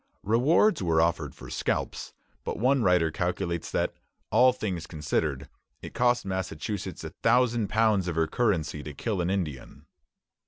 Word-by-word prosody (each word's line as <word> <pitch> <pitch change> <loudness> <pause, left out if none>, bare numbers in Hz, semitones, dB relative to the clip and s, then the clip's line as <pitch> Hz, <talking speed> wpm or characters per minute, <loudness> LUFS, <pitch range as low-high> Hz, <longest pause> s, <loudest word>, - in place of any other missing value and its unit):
Rewards 140 - +3
were 85 -3 +2
offered 85 0 0
for - - -11
scalps; - - -2 0.3
but - - -3
one 130 +4 +3
writer 90 -5 +3
calculates 85 0 -2
that, - - -1 0.4
all 130 0 +6
things 95 -9 -4
considered, 75 -4 -2 0.4
it - - -8
cost 120 -2 +2
Massachusetts 95 0 -4
a - - -6
thousand 120 -4 +2
pounds 110 -4 +2
of 85 - -2
her 80 0 +2
currency 85 -6 0
to 75 -1 -8
kill 100 +2 -2
an 85 - -1
Indian. 85 -9 -4
95 Hz, 150 wpm, -27 LUFS, 85-115 Hz, 0.4 s, all